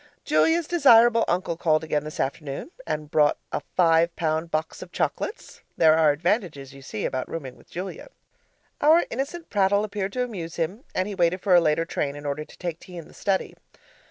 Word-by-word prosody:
Julia's 330 0 +3
desirable 240 -8 +5
uncle 175 -1 -1
called 155 -2 +1
again 150 -2 -1
this 155 - -8
afternoon 140 - -4 0.2
and 150 0 -4
brought 150 -1 +3
a - - -2
five 165 -1 +3
pound 160 0 -1
box 155 0 -3
of - - -10
chocolates. 430 - -4 0.2
There 160 -1 +6
are 160 -1 +4
advantages, 155 - -2
you 135 - -13
see, 120 -5 -5
about 130 -1 -3
rooming 135 -6 -6
with - - -21
Julia. 185 +2 -6 0.7
Our 315 +4 +5
innocent 295 +7 -5
prattle 200 0 +2
appeared 200 -2 -3
to 250 - 0
amuse 180 -9 -6
him 185 +9 -3
and 185 +1 0
he 210 - -5
waited 180 -1 +1
for 195 - +2
a 175 - +7
later 160 0 +1
train 140 -3 -2
in 145 0 -9
order 145 +1 -2
to - - -17
take 170 -2 -5
tea 180 -1 -11
in 165 - -8
the - - -17
study. 195 -2 -1
170 Hz, 195 wpm, -25 LUFS, 155-205 Hz, 0.7 s, a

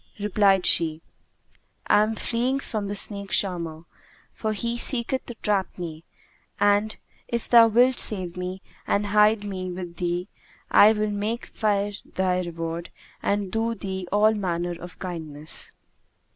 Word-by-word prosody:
Replied 200 -2 +3
she, 160 -2 +3 0.9
'I - - +5
am 215 +1 0
fleeing 245 +5 -1
from 215 -6 -4
the 205 - -3
snake 200 -1 -1
charmer, 170 -5 -1 0.5
for 220 - -2
he 235 +3 -2
seeketh 245 +1 0
to 240 - -7
trap 200 -3 0
me 165 -2 -7 0.5
and, 205 +2 +2 0.3
if 235 -1 -3
thou 230 -1 +7
wilt 245 +3 +3
save 185 -5 +1
me 180 +1 -5 0.2
and 205 +1 +1
hide 210 +1 +4
me 185 -2 -4
with 175 -1 -7
thee, 175 +1 -2 0.4
I 210 - +8
will 210 -1 -1
make 210 +3 -3
fair 205 -2 0
thy 185 -1 -1
reward 165 -1 -5 0.3
and 200 -2 -1
do 225 +1 -1
thee 190 -2 -5
all 210 +2 +4
manner 175 -4 -2
of 175 0 -10
kindness.' 160 -4 0
200 Hz, 145 wpm, -25 LUFS, 180-215 Hz, 0.9 s, I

